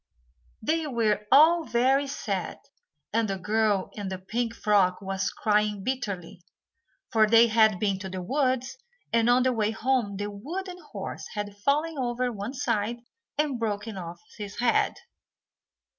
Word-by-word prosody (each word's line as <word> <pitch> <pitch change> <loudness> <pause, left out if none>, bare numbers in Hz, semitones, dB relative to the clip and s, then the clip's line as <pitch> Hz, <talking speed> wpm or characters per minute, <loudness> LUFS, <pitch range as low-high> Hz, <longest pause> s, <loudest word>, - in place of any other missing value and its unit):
They 315 +5 0
were 215 -5 0
all 325 +4 +7
very 265 +2 +2
sad, 200 -9 -3 0.6
and 225 0 +2
the 195 - -1
girl 210 0 +1
in 205 -2 -5
the 190 - -4
pink 230 +5 -3
frock 195 -5 +2
was 195 0 -2
crying 210 -2 0
bitterly, 200 -9 -4 0.7
for 220 -3 +4
they 230 +2 +7
had 220 -3 +4
been 200 -2 0
to 190 -1 -6
the 185 -1 -5
woods, 260 - 0 0.3
and 230 0 +3
on 245 +1 +5
the 255 0 +2
way 215 -2 +1
home 225 -2 0
the 205 +1 -3
wooden 355 - -6
horse - - -6
had 205 -1 -4
fallen 290 +8 0
over 245 0 -1
on 240 - -7
one 205 +5 -5
side 235 -1 -1 0.4
and 290 -5 0
broken 215 -1 -3
off 170 -2 -7 0.2
his 205 -1 -7
head. 240 -1 +2
220 Hz, 155 wpm, -27 LUFS, 205-255 Hz, 0.7 s, all